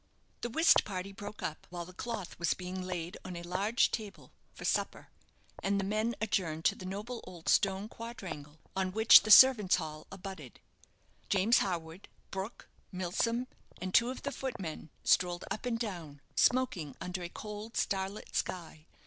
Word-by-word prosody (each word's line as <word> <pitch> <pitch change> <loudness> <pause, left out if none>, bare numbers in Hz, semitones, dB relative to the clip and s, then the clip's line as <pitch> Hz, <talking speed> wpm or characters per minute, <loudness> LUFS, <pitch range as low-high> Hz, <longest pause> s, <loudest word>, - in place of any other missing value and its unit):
The 240 - -2
whist 320 +8 +5
party 190 -1 -5
broke 205 +1 -8
up 155 - -4
while 175 -1 -5
the 185 - -12
cloth 215 -4 -5
was 170 -2 +1
being 185 0 -5
laid 180 -1 -4
on 185 - -6
a 170 - -6
large 195 +6 +2
table 215 -3 -6 0.2
for - - -9
supper, - - -1 0.5
and 200 +1 +1
the - - 0
men 215 +3 0
adjourned 170 -7 -1
to - - +4
the 185 - -8
noble 210 +5 -5
old 175 -3 -11
stone 195 +1 +3
quadrangle, 190 -11 -8 0.2
on 190 -1 -1
which 220 +1 +9
the - - -5
servant's 215 -5 +9
hall 155 -3 -5
abutted. 190 -9 -8 0.7
James 200 +5 +4
Harwood, 170 -1 -3 0.2
Brook, 195 +4 -5 0.2
Milsom, 205 +7 0 0.3
and 185 0 -4
two 235 +1 +5
of 260 - -6
the 280 - -2
footmen 190 - -5
strolled 175 0 +2
up 215 - -3
and 235 -2 0
down, 175 -11 -5 0.2
smoking 195 - +2
under 180 0 -4
a 175 - -5
cold 210 +3 -7
starlit 195 +1 -2
sky. 160 -3 -3
190 Hz, 165 wpm, -32 LUFS, 175-220 Hz, 0.7 s, which